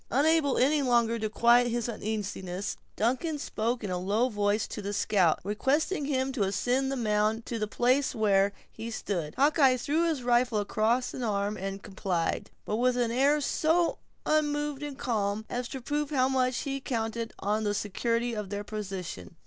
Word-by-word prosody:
Unable 290 +1 +3
any 290 +4 +3
longer 235 -3 +2
to 215 0 -1
quiet 235 +2 +4
his 240 -1 -1
uneasiness, 205 -4 -4 0.2
Duncan 260 +8 0
spoke 235 -3 -2
in 200 - -3
a 180 - -1
low 210 +7 +1
voice 205 -1 +1
to 215 - -5
the 200 +1 -4
scout, 195 -5 +2
requesting 280 - 0
him 265 -2 0
to 260 -5 -3
ascend 245 +7 +1
the - - -1
mound 215 -1 0
to 230 - -4
the 215 - -1
place 255 +5 +1
where 200 -2 +3 0.2
he 225 +1 -7
stood. 175 -8 -3
Hawkeye 275 -2 +4
threw 305 +7 +1
his 305 -6 -1
rifle 240 -1 +2
across 220 +4 +1
an - - -5
arm 205 -2 -1
and 195 0 -5
complied, 190 -4 -2 0.2
but 215 - -1
with 250 +1 +2
an 240 -2 +1
air 280 +5 +3
so 325 +4 +1 0.3
unmoved 295 -2 0
and 290 -2 -5
calm, 215 -3 -1
as 245 0 -2
to 265 - -6
prove 295 +3 -2
how 260 -4 +2
much 255 -2 +1
he 275 -1 -3
counted 230 -2 -2
on 210 +2 -1
the 205 -1 0
security 230 +4 -1
of 210 -3 -4
their 205 0 -3
position. 190 - -6
235 Hz, 180 wpm, -29 LUFS, 210-265 Hz, 0.3 s, quiet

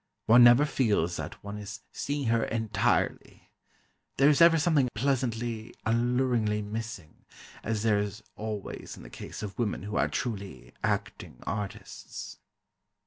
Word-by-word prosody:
One 120 +2 +8
never 120 +4 +8
feels 105 - +1
that - - -7
one 100 +1 -6
is 105 0 -7
seeing 145 -1 -2
her 115 0 +3
entirely. 110 -3 -1 0.7
There 140 +2 +6
is 150 - +2
ever 165 0 +8
something 150 -5 +3
pleasantly, 120 -3 -1
alluringly 115 -2 +1
missing, 105 -6 -7 0.4
as 110 -1 -1
there 105 -2 +3
is 105 +1 -4
always 105 -2 -6
in - - -11
the - - -12
case - - -8
of 105 +1 -7
women 110 -4 -1
who 105 0 -3
are - - +3
truly 100 - -5
"acting - - -2
artists." 105 -1 -6
110 Hz, 140 wpm, -29 LUFS, 105-125 Hz, 0.7 s, One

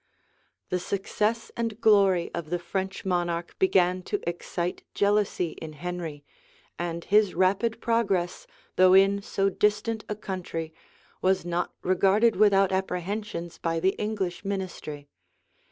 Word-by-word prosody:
The 180 - 0
success 210 +5 -1
and 230 -2 -3
glory 195 -6 +4
of 160 -3 -5
the 175 - 0
French 190 +3 -4
monarch 175 -2 -1
began 185 -1 +3
to 205 - 0
excite 175 +1 -3
jealousy 200 -4 +1
in 155 -1 -8
Henry; 165 -2 -6 0.5
and 170 -1 -3
his 210 -1 +3
rapid 195 +6 +2
progress, 200 -7 0 0.3
though 185 0 +7
in 195 +1 +5
so 195 0 0
distant 210 +2 0
a 210 - -2
country, 175 -5 -5 0.5
was 185 -1 +2
not 175 0 -2
regarded 195 +5 +3
without 195 -1 +4
apprehensions 190 -1 -3
by 165 -1 -1
the 190 +3 +3
English 200 -5 -2
ministry. 185 -7 -5
190 Hz, 125 wpm, -27 LUFS, 175-205 Hz, 0.5 s, though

